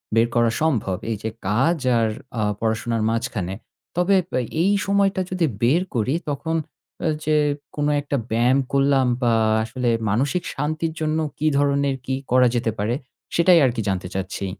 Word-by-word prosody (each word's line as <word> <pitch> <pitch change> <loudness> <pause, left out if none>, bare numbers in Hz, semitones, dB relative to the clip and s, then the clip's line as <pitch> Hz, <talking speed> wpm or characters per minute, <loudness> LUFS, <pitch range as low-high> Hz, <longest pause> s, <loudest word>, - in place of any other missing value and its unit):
বের 115 +1 +4
করা 120 -1 +3
সম্ভব 115 - +1
এই 110 - -1
যে 110 - -1 0.2
কাজ 135 - +2 0.2
আর 110 -1 +2 0.3
আ - - +1 0.2
পড়াশোনার 115 0 -1
মাঝখানে। 115 -5 -2 0.4
তবে 180 +3 +2 0.3
এ - - +1 0.2
এই 195 - +3
সময়টা 195 -1 +2
যদি 185 -3 +1 0.2
বের 135 +9 +3
করি, 120 +4 +1 0.2
তখন 160 +3 -2 0.5
এ - - +2 0.2
যে 155 0 +2 0.4
কোন 145 0 0
একটা 140 0 -2
ব্যায়াম 120 +4 +3
করলাম 135 -1 +3
বা 120 -1 +3 0.3
আসলে 120 +2 -2 0.2
মানসিক 140 - 0
শান্তির 155 +3 -2
জন্য 155 0 0 0.2
কি 155 - 0
ধরনের 140 -1 +2
কি 130 - -1 0.2
করা 125 0 +5
যেতে 115 -2 0
পারে 105 +3 0 0.4
সেটাই 170 0 +6
আর 125 - +2
কি 115 - -1
জানতে 90 -1 -2
চাচ্ছি। 95 +1 -3
130 Hz, 165 wpm, -22 LUFS, 115-155 Hz, 0.5 s, সেটাই